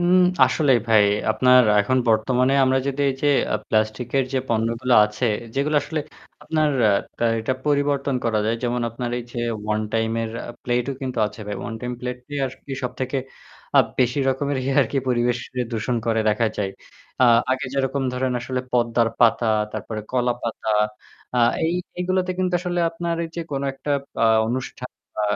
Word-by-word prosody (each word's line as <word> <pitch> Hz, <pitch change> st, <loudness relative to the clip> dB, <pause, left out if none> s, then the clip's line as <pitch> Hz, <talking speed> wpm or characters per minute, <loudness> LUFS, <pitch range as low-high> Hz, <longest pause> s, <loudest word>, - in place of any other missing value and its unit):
উম 175 Hz, +1 st, +4 dB, 0.3 s
আসলেই 140 Hz, -6 st, +3 dB
ভাই 110 Hz, -2 st, +6 dB, 0.3 s
আপনার 125 Hz, +3 st, +5 dB, 0.2 s
এখন 130 Hz, +5 st, +1 dB
বর্তমানে 125 Hz, +4 st, +2 dB
আমরা 130 Hz, 0 st, +3 dB
যদি 140 Hz, 0 st, -2 dB
এই 130 Hz, -, -4 dB
যে 145 Hz, -, +3 dB, 0.3 s
আ -, -, +3 dB
প্লাস্টিকের 110 Hz, +5 st, 0 dB
যে 135 Hz, -, +1 dB
পণ্যগুলো 115 Hz, +2 st, +1 dB
আছে, 105 Hz, +4 st, -3 dB, 0.3 s
যেগুলো 150 Hz, +2 st, +1 dB
আসলে 160 Hz, -2 st, -3 dB, 0.4 s
আপনার 155 Hz, -1 st, +1 dB, 0.6 s
আ -, -, +5 dB
এটা 110 Hz, +4 st, -1 dB
পরিবর্তন 145 Hz, -1 st, +1 dB
করা 115 Hz, -2 st, +1 dB
যায়। 115 Hz, +1 st, +1 dB
যেমন 120 Hz, 0 st, 0 dB
আপনার 120 Hz, +1 st, -4 dB
এই 120 Hz, -, -6 dB
যে -, -, -5 dB, 0.4 s
one 110 Hz, -, -1 dB
time 115 Hz, 0 st, 0 dB
এর 115 Hz, -, -3 dB, 0.2 s
আ -, -, -4 dB
প্লেটও 125 Hz, +2 st, 0 dB
কিন্তু 130 Hz, -2 st, -3 dB
আছে 105 Hz, -, -10 dB
ভাই। 105 Hz, -, -3 dB
One 115 Hz, -, -5 dB
time 125 Hz, 0 st, -4 dB
প্লেট 125 Hz, 0 st, -4 dB
দিয়ে 145 Hz, -1 st, -3 dB
আর 130 Hz, -, -7 dB
কি 140 Hz, -, -6 dB
সবথেকে 130 Hz, +2 st, -2 dB, 0.6 s
আপ -, -, +6 dB
বেশি 125 Hz, +2 st, +2 dB
রকমের 140 Hz, +1 st, 0 dB, 0.2 s
আরকি 140 Hz, +1 st, 0 dB
পরিবেশকে 125 Hz, +1 st, -1 dB
দূষণ 115 Hz, +2 st, -1 dB
করে 115 Hz, -1 st, +2 dB
দেখা 110 Hz, +2 st, +2 dB
যায়। 100 Hz, -2 st, -1 dB, 0.5 s
আ -, -, +8 dB, 0.3 s
আগে 130 Hz, +1 st, 0 dB
যেরকম 135 Hz, 0 st, 0 dB
ধরেন 125 Hz, 0 st, -1 dB
আসলে 125 Hz, +1 st, -3 dB
পদ্মার 120 Hz, -1 st, +2 dB
পাতা, 120 Hz, 0 st, +4 dB, 0.3 s
তারপরে 110 Hz, 0 st, -5 dB
কলাপাতা 120 Hz, -3 st, -1 dB, 0.7 s
আ -, -, +3 dB, 0.3 s
এই 165 Hz, -, +1 dB, 0.3 s
এগুলোতে 185 Hz, 0 st, 0 dB
কিন্তু 185 Hz, -1 st, 0 dB
আসলে 175 Hz, -1 st, -2 dB
আপনার 170 Hz, 0 st, -3 dB
এই -, -, -6 dB
যে -, -, -1 dB
কোনো 135 Hz, 0 st, -2 dB
একটা 135 Hz, +2 st, -6 dB, 0.2 s
বা -, -, +1 dB, 0.2 s
অনুষ্ঠান 125 Hz, +1 st, -4 dB, 0.3 s
বা 110 Hz, -, -1 dB
125 Hz, 175 wpm, -22 LUFS, 115-140 Hz, 0.7 s, আ